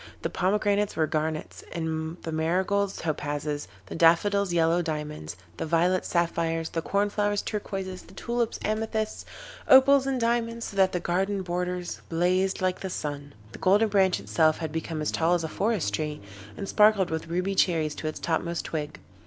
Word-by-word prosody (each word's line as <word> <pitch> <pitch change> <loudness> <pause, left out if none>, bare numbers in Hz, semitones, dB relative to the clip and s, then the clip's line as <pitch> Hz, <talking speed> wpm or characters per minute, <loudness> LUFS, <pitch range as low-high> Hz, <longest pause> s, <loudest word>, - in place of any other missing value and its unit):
The - - -1
pomegranates 205 +1 +1
were 160 - +2
garnets, 155 0 -3
the 160 0 -3
marigolds 190 +5 0
topazes, 145 -2 -3 0.2
the - - -8
daffodils 185 +4 +3
yellow 170 0 +3
diamonds, 150 - -4 0.2
the - - -3
violets 175 +3 +2
sapphires, 165 -1 0
the 165 - -2
corn 200 +4 0
flowers 205 -1 0
turquoises, 195 -3 -4
the - - -16
tulips 235 -1 -1
amethysts, 220 0 -2 0.4
opals 270 +1 +7
and 265 -1 0
diamonds, 230 0 0
so 200 - -7
that 190 -1 +4
the 180 - 0
garden 190 +3 -1
borders 180 0 -3
blazed 185 +3 +1
like 185 0 +1
the 190 - -4
sun. 145 -4 -5 0.2
The - - -10
Golden 205 +4 +4
Branch 190 -3 +3
itself 155 -1 +2
had 160 -2 -4
become 160 -1 -3
as - - 0
tall 170 +2 +2
as 170 - -1
a - - -1
forest 195 - -1
tree, 150 +6 -2 0.4
and 195 - -5
sparkled 210 -4 +4
with 160 +1 -3
ruby 180 +4 -1
cherries 160 -5 +2
to 155 - -5
its 155 - -4
topmost 170 +1 -1
twig. 150 -2 -4
175 Hz, 170 wpm, -27 LUFS, 160-200 Hz, 0.4 s, opals